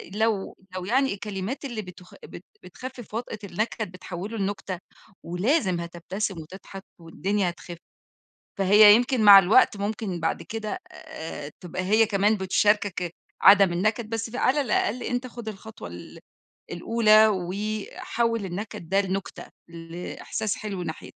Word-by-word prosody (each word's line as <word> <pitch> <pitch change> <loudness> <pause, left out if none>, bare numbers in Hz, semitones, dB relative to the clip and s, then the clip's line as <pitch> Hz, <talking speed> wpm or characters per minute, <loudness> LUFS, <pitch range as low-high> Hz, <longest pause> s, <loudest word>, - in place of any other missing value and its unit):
لو 220 -3 0 0.2
لو 185 -1 -4
يعني، 265 +4 +2
الكلمات 205 +6 -5
اللي 235 -5 -4
بتخ 180 -1 -13
بت 180 - -11 0.2
بتخفِّف 245 +5 -9
وطأة 225 -1 -4
النكَد، 210 +1 -3
بتحوِّله 185 +4 -7
لنُكتة، 195 -2 -3 0.4
ولازم 185 - +1
هتبتسِم 175 +4 -4
وتضحَك 190 +4 -11 0.2
والدنيا 190 +3 -1
هتخِفّ. 175 0 -9 0.8
فهي 205 +2 +8
يمكن 245 0 +1
مع 200 -1 +11
الوقت، 205 +4 +4
ممكن 200 -2 -3
بعد 165 - -1
كده 220 +8 -5
آآ، 160 - -8
تبقى 180 +1 -5
هي 215 +4 +4
كمان 210 0 +2
بتشارِكك 190 -2 +1 0.3
عدَم 195 -3 +7
النكَد. 215 +5 0
بس 225 0 -3
فعلى 260 +4 +1
الأقل 245 -2 0
أنتَ 250 +1 -2
خُد 235 -2 -10
الخطوة 215 - -9
ال 85 0 -11 0.5
الأولى 215 +3 +5
وحوِّل 210 +3 -2
النكَد 185 -2 -6
ده 195 +1 +3
لنُكتة، 195 0 -4 0.2
لإحساس 170 +5 -5
حِلو 200 -4 -5
ناحيت 160 -1 -7
205 Hz, 130 wpm, -25 LUFS, 180-220 Hz, 0.8 s, مع